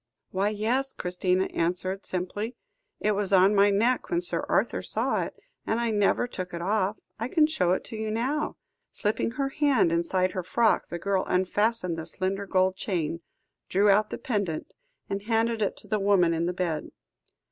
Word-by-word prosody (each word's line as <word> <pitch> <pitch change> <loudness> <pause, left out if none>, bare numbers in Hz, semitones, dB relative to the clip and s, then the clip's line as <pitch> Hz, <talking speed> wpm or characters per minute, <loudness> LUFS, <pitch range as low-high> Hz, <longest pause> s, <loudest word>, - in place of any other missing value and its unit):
"Why, 195 +2 +1
yes," 235 +6 0
Christina 180 +1 0
answered 180 +3 -1
simply. 205 +6 -3 0.4
"It 215 - +1
was 205 -1 0
on 190 +1 +6
my 200 0 +5
neck 230 +6 +1
when 345 - +1
Sir 355 - +3
Arthur - - +1
saw - - +1
it, - - -5 0.3
and 225 - +1
I 235 -1 0
never 205 +2 +2
took 185 -7 -6
it 170 - -5
off. 205 +1 0 0.2
I 230 - -2
can 310 +3 +4
show 185 - +1
it - - -2
to - - -7
you 220 0 -3
now." 260 +8 -1 0.3
Slipping 210 +1 -1
her 270 +1 -1
hand 275 - +2
inside 180 +2 +1
her 185 - -3
frock, 225 +5 +2
the 175 - -5
girl 190 +2 0
unfastened 190 -1 0
the 160 - -6
slender 195 +3 -2
gold 185 0 +2
chain, 170 -5 -2 0.5
drew 200 +2 +4
out 210 +2 +3
the - - -4
pendant, 200 - -3 0.3
and 195 0 -3
handed 225 +1 0
it 200 - 0
to - - -12
the 215 +1 0
woman 195 -4 +3
in 165 +1 0
the 180 - -1
bed. 175 -4 -2
200 Hz, 185 wpm, -27 LUFS, 185-225 Hz, 0.5 s, on